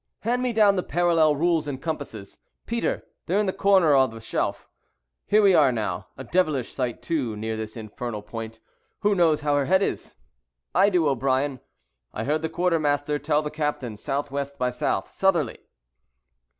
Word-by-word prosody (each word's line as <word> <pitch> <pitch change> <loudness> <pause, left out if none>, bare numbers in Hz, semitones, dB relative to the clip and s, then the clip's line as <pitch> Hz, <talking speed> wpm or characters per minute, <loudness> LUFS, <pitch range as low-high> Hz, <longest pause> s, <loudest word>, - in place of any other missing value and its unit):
Hand 245 +3 0
me 250 -1 0
down 210 -3 +4
the - - +2
parallel 165 -4 +2
rules 165 0 +1
and 135 -3 -4
compasses, 135 -11 -6 0.3
Peter; 235 0 -1 0.2
they 180 - 0
are - - +4
in 210 - +2
the 190 - -1
corner 190 -6 +4
of 135 -1 +5
the 115 0 -10
shelf. 110 - -3 0.6
Here 210 +1 +4
we 195 -2 +6
are 145 -6 +5
now, 110 -3 -3
a - - -7
devilish 155 -9 0
sight 125 -3 -3
too 135 -10 -1
near 110 +1 -3
this 110 +1 -6
infernal 110 0 -6
point. 110 +1 -7 0.4
Who 205 0 +3
knows 165 -5 +3
how 145 -1 +1
her 140 -1 +1
head 190 +4 +3
is?" - - -3 0.6
"I 195 +3 +5
do, 175 -5 +2
O'Brien: 135 0 0 0.6
I - - -2
heard 150 +5 0
the 160 - -2
quartermaster 150 -4 0
tell 150 0 +1
the 150 - -4
captain 150 -6 -2
S.W. 140 +5 -3
by 125 0 +1
S. 125 - -8 0.3
Southerly." 170 -10 +1
150 Hz, 175 wpm, -25 LUFS, 125-175 Hz, 0.6 s, we